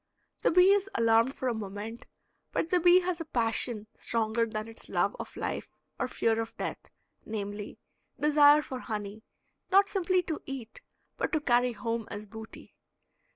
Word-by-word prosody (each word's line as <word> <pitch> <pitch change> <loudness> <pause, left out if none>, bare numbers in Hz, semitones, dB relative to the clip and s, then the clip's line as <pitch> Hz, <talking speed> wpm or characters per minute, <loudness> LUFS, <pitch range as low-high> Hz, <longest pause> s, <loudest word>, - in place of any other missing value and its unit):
The - - +3
bee 365 +3 +6
is 400 0 +2
alarmed 230 +3 +3
for 260 - -3
a 245 - +1
moment, 215 +2 -6 0.4
but 330 - -1
the 360 - +4
bee 355 +2 +6
has 355 -2 -2
a - - -4
passion 230 -4 -1
stronger 230 0 0
than 215 0 -4
its 225 - -11
love - - +1
of - - -7
life - - -3 0.3
or - - 0
fear 225 0 +1
of 225 0 -7
death, - - -3 0.4
namely, 205 -1 -5 0.4
desire 295 0 +6
for 260 -3 -6
honey, 210 -2 -5 0.5
not 395 +1 +5
simply 370 -2 +1
to 320 -3 -4
eat, 260 -5 -7 0.4
but - - -1
to 310 - +3
carry 245 -3 +2
home 230 -1 -3
as 205 +1 -6
booty. 220 +1 -11
235 Hz, 165 wpm, -29 LUFS, 220-310 Hz, 0.5 s, bee